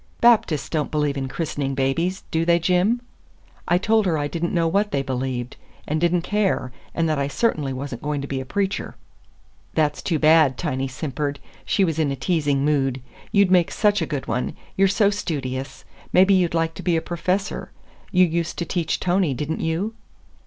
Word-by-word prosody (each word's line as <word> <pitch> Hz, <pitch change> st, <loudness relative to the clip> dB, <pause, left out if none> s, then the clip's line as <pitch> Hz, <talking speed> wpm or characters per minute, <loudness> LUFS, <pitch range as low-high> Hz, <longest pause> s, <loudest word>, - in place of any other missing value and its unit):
"Baptists 225 Hz, -, +4 dB
don't 155 Hz, -3 st, -1 dB
believe 150 Hz, -2 st, 0 dB
in 135 Hz, -1 st, -2 dB
christening 140 Hz, -2 st, -3 dB
babies, 165 Hz, +8 st, 0 dB
do 160 Hz, 0 st, +1 dB
they, 170 Hz, 0 st, +4 dB
Jim?" 180 Hz, +7 st, +2 dB, 0.7 s
I 175 Hz, -, +4 dB
told 215 Hz, +2 st, +2 dB
her 165 Hz, -3 st, +1 dB
I 145 Hz, -1 st, -1 dB
did 170 Hz, +2 st, -5 dB
n't 170 Hz, -, 0 dB
know 170 Hz, -2 st, +2 dB
what 200 Hz, +5 st, +1 dB
they 140 Hz, -5 st, -1 dB
believed, 130 Hz, -2 st, -3 dB, 0.3 s
and 155 Hz, +1 st, -1 dB
did 170 Hz, -1 st, +3 dB
n't 175 Hz, -1 st, +1 dB
care, 200 Hz, -10 st, 0 dB, 0.2 s
and 165 Hz, -1 st, +1 dB
that 155 Hz, -2 st, 0 dB
I 140 Hz, -, 0 dB
certainly 145 Hz, -, 0 dB
was 135 Hz, +1 st, -5 dB
n't 120 Hz, -, -7 dB
going 150 Hz, 0 st, -2 dB
to 140 Hz, -, -5 dB
be 135 Hz, -1 st, -3 dB
a -, -, -4 dB
preacher. 195 Hz, +6 st, -2 dB, 0.8 s
"That's 150 Hz, -2 st, +1 dB
too 165 Hz, -, 0 dB
bad," 155 Hz, -4 st, +5 dB
Tiny 130 Hz, +3 st, -2 dB
simpered. 140 Hz, +2 st, -3 dB, 0.3 s
She 195 Hz, -, +2 dB
was 160 Hz, -3 st, 0 dB
in 150 Hz, -3 st, +1 dB
a -, -, -1 dB
teasing 145 Hz, -1 st, 0 dB
mood. 135 Hz, -3 st, +1 dB, 0.3 s
"You'd 200 Hz, -3 st, +4 dB
make 180 Hz, -2 st, +4 dB
such 205 Hz, -1 st, +2 dB
a -, -, -1 dB
good 145 Hz, -4 st, -4 dB
one. 120 Hz, +3 st, -2 dB, 0.2 s
You're 195 Hz, 0 st, +4 dB
so 200 Hz, +1 st, +3 dB
studious. 135 Hz, -9 st, -4 dB, 0.3 s
Maybe 190 Hz, +2 st, +5 dB
you'd 180 Hz, -3 st, +2 dB
like 165 Hz, 0 st, +1 dB
to -, -, -8 dB
be 175 Hz, -3 st, +1 dB
a -, -, 0 dB
professor. 180 Hz, +3 st, -2 dB, 0.4 s
You 185 Hz, 0 st, +5 dB
used 170 Hz, 0 st, -2 dB
to 170 Hz, -, -2 dB
teach 170 Hz, -2 st, -1 dB
Tony, 180 Hz, -6 st, +1 dB
did 150 Hz, +5 st, -3 dB
n't 160 Hz, -, -2 dB
you?" 170 Hz, +7 st, -1 dB
160 Hz, 200 wpm, -23 LUFS, 140-180 Hz, 0.8 s, bad